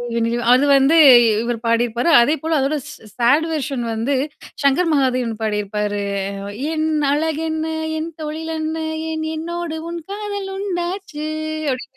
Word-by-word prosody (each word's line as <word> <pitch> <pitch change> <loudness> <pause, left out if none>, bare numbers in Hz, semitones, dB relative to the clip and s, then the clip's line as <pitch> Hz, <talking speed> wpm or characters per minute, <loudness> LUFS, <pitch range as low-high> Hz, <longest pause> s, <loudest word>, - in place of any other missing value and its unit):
வென்னிநிலவே 235 +1 0
அது 265 +3 +4
வந்து 275 +4 +4 0.3
இ - - +4 0.2
இவர் 235 -1 -2
பாடியிருப்பாரு. 235 +5 +1
அதேபோல 310 +4 +1
அதோட 275 +3 0 0.4
சாட் 285 +7 +4
வெர்ஷன் 275 -5 -2
வந்து 230 +6 -1 0.5
சங்கர் 280 +5 +3
மகாதேவன் 255 -5 +1
பாடியிருப்பாரு. 210 -1 -2 0.7
என் 315 0 0 0.2
அழகென்ன? 315 +1 -1 0.3
என் 315 +1 -3
தொழில் 315 +1 -4
என்ன? 315 0 -2 0.3
ஏன் 315 0 -3
என்னோடு 335 0 -4
உன் 340 0 -4
காதல் 405 -1 -4
உண்டாச்சு? 360 -4 -4 0.5
அப்படின்னு 260 +1 -6
300 Hz, 125 wpm, -20 LUFS, 240-320 Hz, 0.7 s, அது